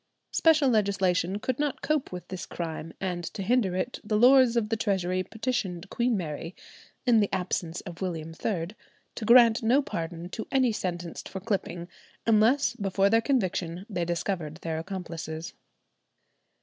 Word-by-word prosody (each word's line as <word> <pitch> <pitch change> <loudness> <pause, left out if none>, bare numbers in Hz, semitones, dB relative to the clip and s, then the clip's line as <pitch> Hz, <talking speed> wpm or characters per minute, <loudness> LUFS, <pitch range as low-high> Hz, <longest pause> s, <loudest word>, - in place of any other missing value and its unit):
Special 315 -3 +4
legislation 195 -5 +2
could 255 +4 -2
not 295 -2 -1
cope 305 -2 0
with 180 -1 -7
this 185 -1 -6
crime, 165 -1 -5
and 180 -2 -3
to 195 +4 -5
hinder 210 -3 +2
it 215 +7 -2
the 210 0 0
Lords 250 0 +6
of 215 -2 +1
the 225 - +1
Treasury 185 -4 0
petitioned 195 -4 -3
Queen 240 -2 +1
Mary 165 0 -5 0.5
(in 240 -3 +5
the 205 - +1
absence 180 -2 -2
of 175 -1 -10
William 165 -4 -3
III) 175 -6 -1 0.4
to 220 - -5
grant 235 0 +7
no 240 +5 +4
pardon 165 -4 -5
to 220 - -6
any 260 -3 +3
sentenced 175 -5 -4
for 190 - -5
clipping 185 -4 -3 0.4
unless 225 +2 +4
before 200 -2 +1
their 225 0 +5
conviction 185 - -1
they 180 -5 -2
discovered 170 -2 -2
their 160 -1 -2
accomplices. 165 -3 -6
195 Hz, 155 wpm, -28 LUFS, 175-230 Hz, 0.5 s, grant